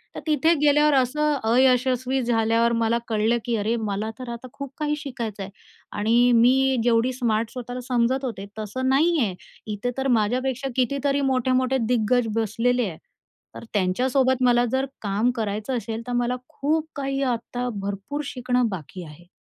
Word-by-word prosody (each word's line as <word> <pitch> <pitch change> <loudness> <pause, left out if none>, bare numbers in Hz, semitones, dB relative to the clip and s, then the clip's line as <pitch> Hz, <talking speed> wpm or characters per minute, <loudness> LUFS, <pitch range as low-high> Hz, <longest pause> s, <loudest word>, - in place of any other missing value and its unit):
तर - - -4
तिथे 310 +2 +3
गेल्यावर 295 0 +4
असं 300 +4 +2 0.2
अयशस्वी 255 +1 +2
झाल्यावर 230 0 +2
मला 230 0 +1
कळलं, 220 +1 +1
की 235 -1 0
अरे 220 +2 0
मला 205 +2 -2
तर 255 -2 -7
आता 235 +2 -8
खूप 280 -2 -7
काही 300 -1 -1
शिकायचं 235 -8 -5
आहे. 195 - -8 0.5
आणि 235 +3 +4
मी 260 +3 +4
जेवढी 240 +1 +2
स्मार्ट 230 -3 -1
स्वतःला 250 0 -6
समजत 255 +2 +1
होते 200 -6 -5
तसं 260 +5 -2
नाही 320 +5 +3
आहे. 205 -8 0 0.4
इथे 230 +4 -3
तर 270 0 -1
माझ्यापेक्षा 255 +4 -1
कितीतरी 280 +2 +1
मोठे-मोठे 255 +1 +1
दिग्गज 245 0 +2
बसलेले 230 +2 +1
आहे. 160 - -9 0.6
तर - - -8
त्यांच्यासोबत 255 +7 +1
मला 240 0 +4
जर 265 +1 +1 0.2
काम 210 +4 +1
करायचं 220 +3 -2
असेल, 225 0 -4
तर 245 - -3
मला 245 +1 0
खूप 310 +2 -1
काही 275 -1 -2
आता 245 +2 -4
भरपूर 200 +9 -4
शिकणं 250 -1 +1
बाकी 185 0 -7
आहे. 165 +2 -14
245 Hz, 160 wpm, -24 LUFS, 225-265 Hz, 0.6 s, गेल्यावर